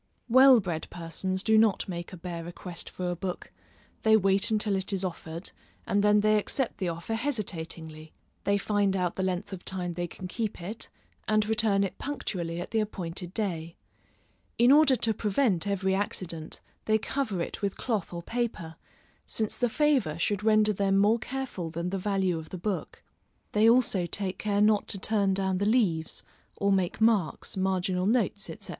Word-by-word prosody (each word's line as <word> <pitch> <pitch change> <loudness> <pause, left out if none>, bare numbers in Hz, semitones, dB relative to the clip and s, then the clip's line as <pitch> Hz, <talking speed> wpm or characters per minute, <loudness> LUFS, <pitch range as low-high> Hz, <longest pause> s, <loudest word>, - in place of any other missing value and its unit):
Well 260 +1 +8
bred 175 -6 -3
persons 185 +3 -2
do 220 -1 +5
not 220 -3 +2
make 175 -2 -5
a 185 - -8
bare 170 -1 -6
request 175 0 -7
for 180 -1 -3
a - - -2
book; 180 +1 -5 0.5
they 220 0 +5
wait 195 +2 +3
until 210 -2 +1
it 190 +1 -1
is 195 -1 -1
offered, 165 -1 -5 0.3
and 200 +1 +1
then 210 0 +5
they 215 0 +4
accept 255 +4 -2
the 185 -3 0
offer 170 +6 -4
hesitatingly; 165 - -4 0.3
they 200 0 +2
find 200 -1 +1
out 180 -2 -1
the - - -2
length 185 +1 -2
of 185 - -7
time 180 -2 -1
they 175 +1 -3
can 185 +2 -8
keep 220 +3 -3
it, 205 +6 -5 0.4
and 215 0 +3
return 215 -2 +2
it 195 - -4
punctually 175 -12 -3
at 175 - -6
the 225 - +1
appointed 180 -4 -4
day. 170 -6 -2 0.8
In 240 +2 +6
order 290 -2 +6
to 225 -2 +1
prevent 205 -2 +1
every 190 -1 0
accident, 175 -5 -3 0.2
they 220 0 +3
cover 220 -3 -2
it 170 - -4
with 200 -1 -2
cloth 220 -7 -2
or 170 -1 -6
paper, 220 -8 -3 0.5
since 220 -2 -1
the 245 - +1
favor 260 - +2
should 205 +4 -1
render 215 -1 +4
them 195 0 +1
more 210 +4 +4
careful 250 -10 -4
than 170 +2 -3
the 195 - -2
value 190 -3 0
of 160 - -10
the 185 - -6
book; 195 +1 -4 0.5
they 215 +2 +5
also 230 -7 +3
take 190 0 -3
care 205 -1 +1
not 210 -1 +3
to - - -4
turn 200 -1 +1
down 190 -1 0
the - - 0
leaves, 190 -9 +1 0.3
or 200 0 +1
make 190 +1 0
marks, 210 -9 +1
marginal 185 -1 0
notes, 210 -3 +1
&c. 165 - -7
195 Hz, 180 wpm, -28 LUFS, 175-215 Hz, 0.8 s, Well